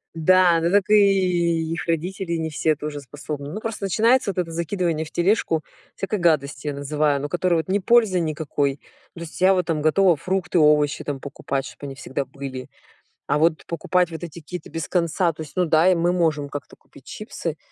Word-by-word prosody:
Да, 175 +1 +4
ну 170 +1 +1
так 205 0 +2
и 180 -5 +3
их 165 - -4
родители 175 +2 -2
не 160 0 -2
все 155 +1 +1
тоже 150 0 -5
способны. 145 +1 -7
Ну, 210 - -4
просто 225 -2 -5
начинается 225 +3 +3
вот - - -14
это 170 -2 -2
закидывание 170 -1 -1
в 155 - -12
тележку 175 -4 +1 0.3
всякой 200 +2 -3
гадости, 150 -4 +1
я 145 - -1
называю. 145 0 0
Ну 145 - -4
которую, 175 0 +1
вот, 160 - -4
не 200 +2 +2
пользы 215 -2 +3
никакой. 150 -3 -1 0.4
То - - -11
есть 165 -2 -8
я 190 +1 +6
вот 180 -2 0
там 155 -3 0
готова 175 +3 +4
фрукты, 185 +2 -1
овощи 150 -1 +3
там 145 -2 -4
покупать, 135 0 -4
чтобы - - -10
они 135 - -7
всегда 135 0 -4
были. 130 -1 -8 0.6
А 150 - +2
вот 160 0 +2
покупать 175 +1 0
вот 160 +1 -7
эти 170 0 -7
какие-то 170 +1 -8
без 165 -2 -4
конца, 170 0 +1
то 155 - -9
есть 150 -3 -9
Ну 180 -1 +2
да, 165 +3 +4
мы 170 +1 +2
можем 160 -5 0
как-то 145 -1 -8
купить - - -20
чипсы, - - -6
165 Hz, 200 wpm, -23 LUFS, 150-180 Hz, 0.6 s, я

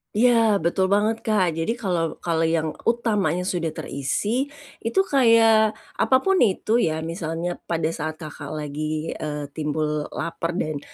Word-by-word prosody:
Iya, 245 +3 +5 0.3
betul 175 +3 +2
banget 215 +2 +2
Kak. 205 -6 +2
Jadi 165 +6 0
kalau 170 -5 -1
kalau 165 -1 +1
yang 160 -1 0 0.2
utamanya 215 -6 +1
sudah 165 -4 -2
terisi, 210 - -1 0.3
itu 385 - 0
kayak 225 - +4 0.2
apa 260 - +4
pun 385 -1 +3
itu 220 +1 +2
ya, 160 -6 0
misalnya 165 +1 -3
pada 165 -2 0
saat 155 -1 -4
Kakak 150 -2 -7
lagi, 155 +1 -3
eee, 150 -2 -5
timbul 150 0 -2
lapar 165 0 -3
dan, 155 -4 -2
170 Hz, 145 wpm, -23 LUFS, 155-215 Hz, 0.3 s, Iya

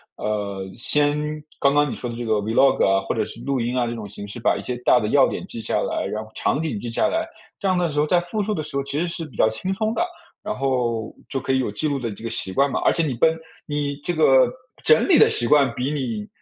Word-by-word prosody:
呃， 100 -2 -3
先 145 +4 +2 0.4
刚 140 +1 +3
刚 145 0 +3
你 - - -3
说 125 - -5
的 120 - -5
这 120 0 -5
个 110 - +1
vlog 115 +6 +3
啊， 95 0 +3
或 - - -2
者 - - 0
是 - - -8
录 135 -3 -1
音 120 +2 -1
啊 125 - +2
这 120 - -3
种 110 -3 -7
形 100 0 -8
式 105 +4 -7
把 120 - +2
一 - - -5
些 125 - -3
大 125 0 +4
的 105 - -2
要 135 +1 +5
点 - - -4
记 115 -11 -7
下 - - -2
来， - - -2
然 110 +1 -4
后 110 - -18
场 140 - 0
景 155 -10 -2
记 120 - -5
下 115 - -1
来。 325 0 -1 0.3
这 200 - -1
样 185 - +2
的 175 -1 +1
时 145 - -5
候 150 - +3
在 175 +2 +4
复 175 +5 -3
述 215 - -2
的 160 - -2
时 150 -1 -7
候 140 - 0
其 140 +2 -3
实 175 - 0
是 170 -1 -4
比 130 -9 -14
较 110 - +4
轻 185 +12 -3
松 220 +3 -1
的， 345 - +1 0.4
然 215 - -2
后 120 -4 -1 0.2
就 135 - -2
可 135 0 -1
以 130 - +2
有 125 -5 -1
记 105 +9 -1
录 145 - 0
的 115 -3 -3
这 100 - -12
个 115 - -3
习 95 -4 -2
惯 140 +9 +2
嘛， - - -1
而 - - +4
且 165 - +1
你 140 - -1
本 160 +7 +3 0.3
你 145 -1 -2
这 175 - -1
个 135 -5 +5 0.3
整 465 - +5
理 - - +6
的 445 - +7
习 435 - +1
惯 140 -5 +4
比 125 +3 -2
你 120 -8 -3
135 Hz, 320 characters per minute, -23 LUFS, 115-150 Hz, 0.4 s, 的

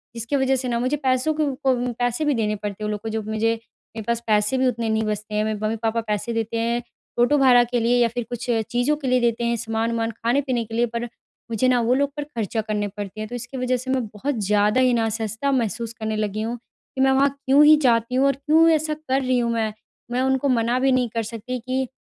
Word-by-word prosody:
जिसकी 235 +5 -3
वजह 265 0 +2
से 255 0 -3
ना 235 -1 0
मुझे 255 +4 0
पैसों 260 +4 +2
को 260 -4 0
पैसे 245 +5 0
भी 295 - +2
देने 210 -2 0
पड़ते 205 0 -5
हैं - - -1
वो - - -2
लोग 210 0 -4
को 225 - -4
जो 220 0 -2
मुझे 220 +1 0 0.4
मेरे 220 - -4
पास 235 -1 +1
पैसे 210 +4 +2
भी 260 0 +2
उतने 230 -2 -1
नहीं 220 0 +1
बचते 210 0 -3
हैं। 210 - +2
मेरे 215 -1 -2
मम्मी-पापा 225 +1 -1
पैसे 210 +3 -2
देते 225 0 -2
हैं 235 +1 0 0.4
ऑटो 290 +4 +4
भाड़ा 250 -3 +6
के 240 0 -1
लिए 235 +2 +2
या 235 - +5
फ़िर 240 +1 -4
कुछ 240 0 -5 0.2
चीज़ों 245 +5 +2
के 280 -3 -5
लिए 255 0 +3
देते 235 0 +1
हैं 235 0 +1
सामान-वामान 225 0 -1
खाने-पीने 240 +2 0
के 225 - -11
लिए 240 +1 +3
पर 235 - -1 0.5
मुझे 240 +3 +1
ना 250 -1 +3
वो 235 +2 +2
लोग 280 +1 +1
पर 295 - -2
ख़र्चा 225 -6 -3
करने 210 -1 -2
पड़ते 205 0 -6
हैं। 215 - -4
तो 245 - -5
इसकी 245 +3 -7
वजह 255 0 0
से 260 +2 -4
मैं 255 -3 0
बहुत 270 +6 -2
ज़्यादा 210 +4 +3
ही 250 -1 +4
ना 225 -1 +2
असहजता 225 +5 -2
महसूस 230 -2 -1
करने 220 0 -2
लगी 215 0 -2
हूँ। 235 +2 -3 0.4
कि 265 - -1
मैं 265 0 +4
वहाँ 275 +1 +4 0.2
क्यों 275 +3 +6
ही 310 - +8
जाती 235 0 +2
हूँ 265 - +3
और 275 - +3
क्यों 310 +4 +4
ऐसा 310 0 -1
कर 275 -3 -1
रही 255 -1 +1
हूँ 235 -1 0
मैं? 220 -2 -1 0.4
मैं 250 +1 0
उनको 265 +1 +1
मना 240 0 +2
भी 265 0 +3
नहीं 250 -2 +2
कर 230 0 -2
सकती 230 +3 -5
कि 260 +2 -2
240 Hz, 250 wpm, -23 LUFS, 225-260 Hz, 0.5 s, ही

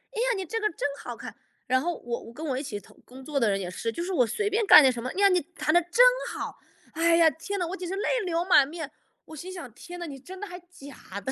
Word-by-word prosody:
呀， 475 +3 0
你 385 - -3
这 450 +7 -3
个 430 - +1
真 305 - -2 0.2
好 - - -6
看。 - - -9 0.3
“然 260 +1 +3
后 345 +3 -2
我 235 0 -4
我 230 - -12
跟 310 +6 -7
我 265 -4 -1
一 - - -2
起 210 -7 -5 0.3
工 260 +2 -13
作 280 0 -2
的 230 - +3
人 195 -1 0
也 185 -2 -4
是， 230 +5 -3
就 335 - -4
是 370 - -4
我 250 -8 +3
随 410 - -1
便 435 +2 +1
干 305 - +10
点 265 - +5
什 240 -2 -5
么， 255 - -4
哎 - - -7
呀， 400 - +7
你 365 -1 +3 0.2
弹 310 - 0
得 350 - +6
真 350 +8 +4 0.3
好， - - -5 0.4
哎 335 +1 +3
呀， 335 -1 +6
天 330 +7 -5
呐， 355 - 0
我 365 - -4
简 360 - -6
直 380 - -2
泪 405 - -1 0.2
流 340 -1 0
满 290 -7 +6
面， 310 -1 -7 0.3
我 315 - -11
心 355 +5 -8
想， 345 -10 -8
天 355 +8 -10
哪， 345 - -4
你 280 -4 -8
真 370 +8 -11
的 410 - -5
还 360 -1 -8
假 285 - -11
的， 265 - -3
330 Hz, 315 characters per minute, -27 LUFS, 265-360 Hz, 0.4 s, 干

